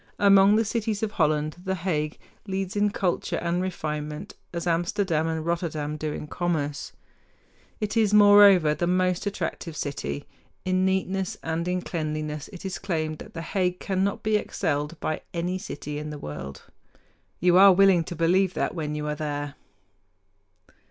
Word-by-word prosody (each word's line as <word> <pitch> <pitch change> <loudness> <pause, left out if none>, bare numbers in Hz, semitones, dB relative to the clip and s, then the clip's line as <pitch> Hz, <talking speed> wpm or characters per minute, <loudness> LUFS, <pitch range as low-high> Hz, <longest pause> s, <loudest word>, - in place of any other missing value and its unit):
Among 200 0 +6
the 225 +1 +3
cities 220 -1 -2
of 215 - -1
Holland, 155 -2 0
The 190 0 -1
Hague 160 -4 -2 0.3
leads 190 0 -3
in 205 0 +3
culture 190 -3 -1
and 175 +1 -1
refinement, 155 -1 -4 0.2
as 170 0 -4
Amsterdam 170 -1 0
and 160 -1 -2
Rotterdam 160 -3 -2
do 155 0 -3
in 150 - -5
commerce. 150 -3 -2 0.9
It 210 +1 -2
is, 220 -3 +3
moreover, 205 -6 +7
the 170 +3 -1
most 185 +1 +1
attractive 170 -5 -4
city. 145 0 -4 0.4
In 185 0 +2
neatness 190 0 -1
and 165 +1 -2
in 180 0 -1
cleanliness 155 -2 -3
it 185 -1 -10
is 190 - -4
claimed 155 -5 -2
that - - -11
The 165 - -4
Hague 180 +1 -1
cannot 195 0 -1
be 215 -1 +3
excelled 150 -4 -2
by 155 - -2
any 180 +2 -1
city 150 -6 -6
in 150 0 -5
the 150 - -6
world. 70 - -7 0.8
You 180 +1 +4
are 195 0 +9
willing 190 -2 +5
to 175 - -6
believe 180 +3 +2
that - - -1
when 150 -3 -3
you 150 0 -3
are 150 - -1
there. 145 -1 -4
175 Hz, 160 wpm, -26 LUFS, 155-190 Hz, 0.9 s, are